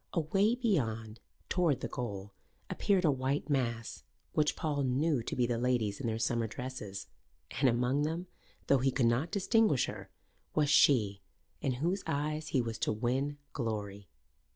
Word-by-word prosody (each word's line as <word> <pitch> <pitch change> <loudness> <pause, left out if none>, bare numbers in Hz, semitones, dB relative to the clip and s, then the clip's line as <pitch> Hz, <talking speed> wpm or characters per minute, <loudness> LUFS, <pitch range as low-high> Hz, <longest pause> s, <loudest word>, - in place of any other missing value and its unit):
Away 195 +7 +2
beyond, 115 - -1 0.3
toward 170 -8 +1
the - - -2
goal, 100 -4 -5 0.4
appeared 190 -3 +2
a 150 - +5
white 135 +3 -1
mass, 115 -4 -1 0.3
which 150 -1 +2
Paul 150 -3 -1
knew 135 +2 +1
to - - -4
be 125 - +2
the 120 -1 -1
ladies 120 -5 0
in 130 - -2
their 110 -1 -1
summer 115 0 0
dresses; 110 -5 -6 0.5
and 135 0 +3
among 125 +4 +1
them, 165 +4 -1 0.4
though 140 - +4
he 135 +2 +2
could 130 -1 +1
not 120 +8 +2
distinguish 205 - +3
her, - - -7 0.5
was 150 -2 +3
she 110 -9 +4 0.4
in 135 - 0
whose 170 +10 -1
eyes 150 +2 -1
he 130 -5 +1
was 115 -1 -4
to - - +1
win 130 +6 -1 0.2
glory. 105 -4 -4
130 Hz, 160 wpm, -32 LUFS, 115-150 Hz, 0.5 s, a